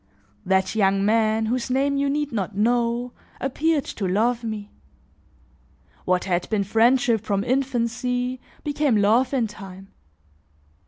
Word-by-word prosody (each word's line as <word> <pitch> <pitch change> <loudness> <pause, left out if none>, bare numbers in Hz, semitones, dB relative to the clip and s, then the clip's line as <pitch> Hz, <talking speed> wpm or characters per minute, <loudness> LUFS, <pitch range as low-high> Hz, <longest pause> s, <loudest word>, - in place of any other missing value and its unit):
"That 190 0 +2
young 195 -2 +2
man, 220 0 +2
whose 245 +3 -2
name 275 +2 +1
you 280 0 +1
need 295 0 -1
not 205 -3 -3
know, 240 +2 +1 0.3
appeared 295 +2 0
to 195 - -4
love 230 +6 +1
me. 215 -2 -5 1.3
What 180 0 +1
had 180 -2 -1
been 215 -2 +1
friendship 230 +2 +3
from 200 -2 -1
infancy, 250 0 -1 0.2
became 290 -5 +1
love 220 +5 +3
in 260 -4 +1
time. 195 -2 -10
230 Hz, 125 wpm, -23 LUFS, 205-255 Hz, 1.3 s, friendship